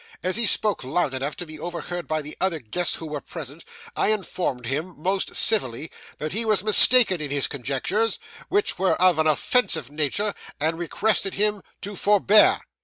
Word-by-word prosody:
As 185 - 0
he 230 -1 +2
spoke 210 -6 +1
loud 140 +2 -1
enough 135 +3 -4
to 175 - -6
be 155 -1 -11
overheard 175 +1 -6
by 155 -1 -2
the 150 - -8
other 185 -3 0
guests 160 +7 -2
who 165 - -9
were 150 -2 -6
present, 155 -1 -9 0.3
I - - 0
informed 180 - -2
him 155 +8 -4
most 190 +4 -2
civilly 155 - +2 0.3
that 155 0 -5
he 220 +5 -1
was 215 -4 0
mistaken 215 -3 +7
in 150 - -5
his 140 -1 0
conjectures, 140 - -2 0.3
which 410 +1 0
were 190 0 +2
of 180 -3 +3
an 155 - +2
offensive 155 - 0
nature, 155 +8 -1 0.3
and 160 +3 -1
requested 195 +3 -1
him 210 0 0 0.2
to 205 +1 -7
forbear. 210 +1 +4
175 Hz, 180 wpm, -23 LUFS, 150-205 Hz, 0.3 s, mistaken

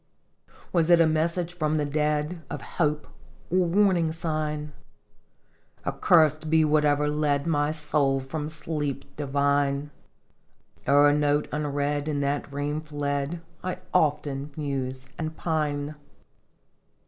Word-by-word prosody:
Was 170 -2 +2
it 175 -1 +7
a 165 - +6
message 165 +2 0
from 155 -3 0
the 150 - 0
dead, 150 +3 -1
Of - - -5 0.2
hope, 150 -1 +1 0.5
or 185 - +3
warning 180 -3 +3
sign? 155 -2 -3 1.1
Accursed 155 -2 +3
be 160 0 +4
whatever 150 -1 +3
led 150 -1 +1
My 145 -3 +1
soul 150 -3 +1
from 150 +3 -4
sleep 150 -3 -3
divine! 140 0 0 1.0
O'er 145 +1 +6
note 145 0 +2
unread 145 0 -1
in 150 -2 -1
that 140 +1 -1
dream 145 +2 -2
fled 145 +1 -3 0.2
I 185 -1 -2 0.2
often 145 -4 +1
muse 135 -3 -3
and 160 -1 -4
pine 150 -3 -1
150 Hz, 115 wpm, -26 LUFS, 145-155 Hz, 1.1 s, it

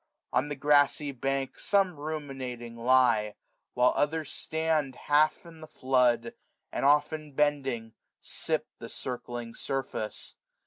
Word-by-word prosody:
On 145 - +1
the 145 - -3
grassy 145 +1 +3
bank 135 0 -2
Some 195 -4 +2
ruminating 135 -6 -5
lie; 115 -3 +3 0.4
while 125 0 +4
others 155 0 0
stand 160 -4 -1
Half 150 +5 +2
in 165 -1 -13
the 155 - -9
flood, 130 - +2 0.4
and - - -3
often 150 +1 +2
bending 135 -6 0 0.3
sip - - -2
The - - -8
circling 120 -2 -5
surface. 130 -6 -4
135 Hz, 120 wpm, -29 LUFS, 125-150 Hz, 0.4 s, while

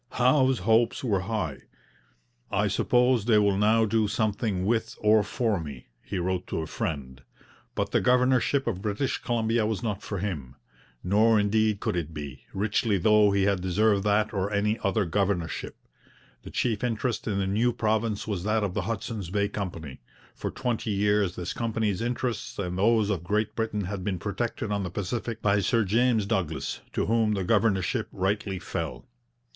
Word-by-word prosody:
Howe's 130 +1 +3
hopes 115 +5 +2
were 105 -6 +1
high. 95 -8 -3 0.9
'I - - +1
suppose 125 -3 +2
they 115 -2 +4
will 100 -2 +3
now 110 +3 +3
do 110 0 +1
something 105 -2 -1
with 115 +1 0
or 105 0 +5
for 105 -1 -1
me,' 70 -7 -8
he - - -5
wrote 90 +1 -2
to - - -2
a - - -3
friend. 65 -5 -4 0.5
But - - -1
the - - +2
governorship 125 +2 +3
of 95 -6 -2
British 105 +6 -1
Columbia 115 -1 0
was 110 +1 -2
not 105 -4 -2
for 100 - -5
him. 75 -10 -4 0.5
Nor 110 +4 +4
indeed 105 0 +1
could - - -1
it 80 -2 -3
be, 70 -3 -7
richly 105 +1 +1
though 105 +2 +5
he 100 -1 +2
had 100 -2 +1
deserved 100 +2 +2
that 105 +1 +2
or 100 0 -1
any 105 +2 +1
other 100 +1 +1
governorship. 90 -2 -1 0.7
The - - -10
chief 115 -3 -1
interest 120 0 -1
in 100 -3 0
the 100 - 0
new 110 +6 +2
province 110 -2 0
was 100 -5 -3
that 110 +1 +1
of 100 -3 -1
the 105 - -1
Hudson's 105 -4 -4
Bay 100 +2 0
Company; 85 -9 -6 0.3
for - - -4
twenty 120 -3 -2
years 105 -2 +1
this 90 - -4
company's 110 -4 -1
interests 120 -1 -3
and 90 -3 -3
those 105 +2 +3
of 90 -5 -2
Great 105 +4 -1
Britain 110 -2 -1
had 95 0 -4
been 95 -2 -1
protected 105 +3 -3
on 100 -1 0
the 90 - -3
Pacific 110 +5 -4
by 105 0 +3
Sir 115 +4 +2
James 115 +1 +2
Douglas, 80 -8 -2
to - - 0
whom 110 -1 +2
the 95 - -1
governorship 100 -2 +1
rightly 100 +1 -1
fell. - - -5
105 Hz, 175 wpm, -27 LUFS, 95-115 Hz, 0.9 s, or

